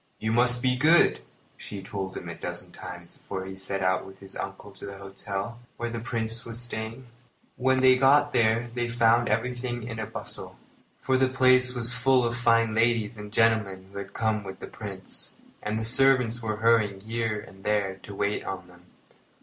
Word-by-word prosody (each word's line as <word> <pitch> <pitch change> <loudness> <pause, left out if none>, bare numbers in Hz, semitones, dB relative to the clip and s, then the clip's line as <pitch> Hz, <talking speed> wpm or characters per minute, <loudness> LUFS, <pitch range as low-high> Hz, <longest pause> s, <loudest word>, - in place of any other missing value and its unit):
"You 110 - -1
must 120 +1 +3
be 125 -1 +3
good," 150 - +4 0.4
she 100 -2 -8
told 95 -1 -5
him - - -7
a - - -5
dozen - - -7
times 90 -1 -10
before 95 -1 -6
he 95 0 -7
set 95 0 -4
out 95 0 +2
with 95 0 -12
his 95 0 -13
uncle 100 +1 -6
to 95 - -9
the 100 0 -8
hotel 100 +3 -5 0.2
where 120 0 -3
the 115 - -3
Prince 115 -1 -2
was 115 0 -5
staying. 115 +1 -5 0.5
When 130 0 +2
they 130 0 +6
got 145 +2 +4
there 115 0 +2
they 120 -1 -1
found 115 0 +3
everything 125 -1 -2
in 115 -1 -6
a 110 - -3
bustle, 110 - -8 0.4
for 130 -1 +2
the 130 0 +3
place 130 -1 +4
was 120 0 -1
full 130 0 +3
of 120 0 -1
fine 115 -2 +3
ladies 115 0 +2
and 105 -1 -9
gentlemen 105 -4 +1
who 100 - -6
had 100 - -8
come 110 -2 0
with 95 -1 -8
the - - -8
Prince, 95 -3 -6 0.3
and 105 +1 -2
the 110 - -2
servants 125 -1 +5
were 110 -2 -2
hurrying 110 -3 +2
here 115 0 -2
and 95 -1 -13
there 100 -2 0
to 100 - -9
wait 100 +1 -1
on 95 -1 -5
them. 90 0 -19
115 Hz, 195 wpm, -27 LUFS, 100-120 Hz, 0.5 s, they